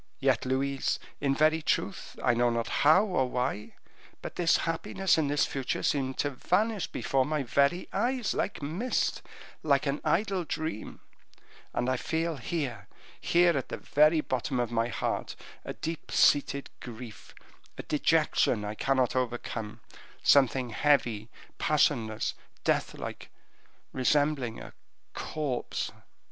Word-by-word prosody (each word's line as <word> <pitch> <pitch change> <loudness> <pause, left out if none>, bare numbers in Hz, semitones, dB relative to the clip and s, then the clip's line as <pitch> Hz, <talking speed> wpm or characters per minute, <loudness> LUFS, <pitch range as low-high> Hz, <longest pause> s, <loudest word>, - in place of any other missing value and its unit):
Yet, - - +1
Louise, 135 +1 0 0.2
in 135 -1 +1
very 155 +2 +3
truth 190 +4 -2
I 120 - +4
know 120 +1 +3
not 115 -1 -1
how 160 +8 +6
or 155 -11 0
why, 125 -4 -2 0.5
but - - -6
this 175 -2 +3
happiness 170 +3 +1
and 155 -3 +1
this 145 0 +2
future 135 -4 -3
seem 130 -2 0
to 145 - -1
vanish 205 - 0
before 135 -2 0
my 150 0 -1
very 140 +7 +1
eyes 240 +3 0
like 170 - -2
mist 180 - -1 0.4
like 140 -2 +2
an 140 +1 -1
idle 195 0 +1
dream; 160 -7 -5 0.7
and 120 - -1
I 130 0 +1
feel 160 +3 -2
here, 135 -1 -4 0.3
here 175 -1 +3
at 135 - -2
the - - -4
very 155 +2 +3
bottom 130 -1 -2
of 120 -1 -1
my 115 0 +1
heart, 120 - -3 0.3
a - - -5
deep 165 0 -5
seated 140 -1 +3
grief, 120 -3 -10 0.4
a - - -5
dejection 105 - +2
I 105 - -3
cannot 130 +2 +1
overcome 115 -3 -3 0.4
something 130 -3 +4
heavy, 115 -5 +1 0.3
passionless, 120 -8 +1 0.3
death - - 0
like, - - -7 0.6
resembling 135 -3 +1
a - - -10 0.4
corpse. 145 -5 -3
140 Hz, 135 wpm, -29 LUFS, 125-160 Hz, 0.7 s, how